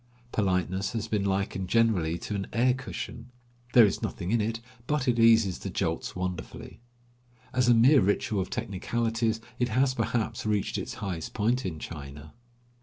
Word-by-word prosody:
Politeness 95 0 0
has 115 -2 -2
been 105 -2 0
likened 95 -1 -1
generally 95 -8 +2
to 105 - -6
an 100 -1 -3
air 125 +2 +3
cushion. 120 -2 -7 0.4
There 120 -3 +9
is 100 - -1
nothing 90 - -3
in 115 -1 +3
it, 115 +2 -2 0.3
but 150 -3 0
it 120 -1 +2
eases 115 -5 +5
the - - -5
jolts - - -2
wonderfully. 90 +3 -5 0.7
As 125 -1 +3
a 120 - +7
mere 130 +5 +6
ritual 105 +2 +1
of 90 - -4
technicalities 115 +2 -1 0.2
it 125 0 +1
has 130 +4 +2
perhaps 115 -1 -1
reached 105 -2 0
its - - -5
highest 90 -6 -5
point 115 +2 +1
in 80 -3 -5
China. 75 -1 -9
110 Hz, 165 wpm, -28 LUFS, 95-120 Hz, 0.7 s, There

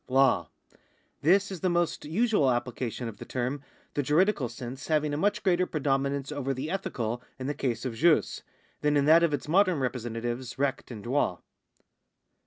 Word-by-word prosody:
Law. 135 0 +3 0.7
This 195 +6 +3
is 190 - -5
the 185 - +1
most 175 -3 0
usual 205 - +2
ap])lication 120 -1 -2
of 115 - -7
the - - -8
term, 130 +3 -3 0.3
the 145 - 0
juridical 150 +1 +2
scn.se 125 +5 -7
having 150 -1 +2
a - - 0
much 200 +7 0
greater 180 -1 +2
predominance 140 -1 -1
over 135 -2 -2
the 145 +6 -4
ethical 120 - -3 0.2
in 130 - -6
the 145 - -1
case 130 -3 -2
of 125 - -2
ju^, 160 +7 +2 0.4
than 150 0 +2
in 140 - +3
that 160 +3 +7
of 170 -2 +3
its 145 -1 -3
modern 185 +1 +3
representatives 120 -1 -3
recht 140 0 -1
and 110 -5 -8
droit. 120 -8 0
140 Hz, 175 wpm, -28 LUFS, 125-165 Hz, 0.7 s, that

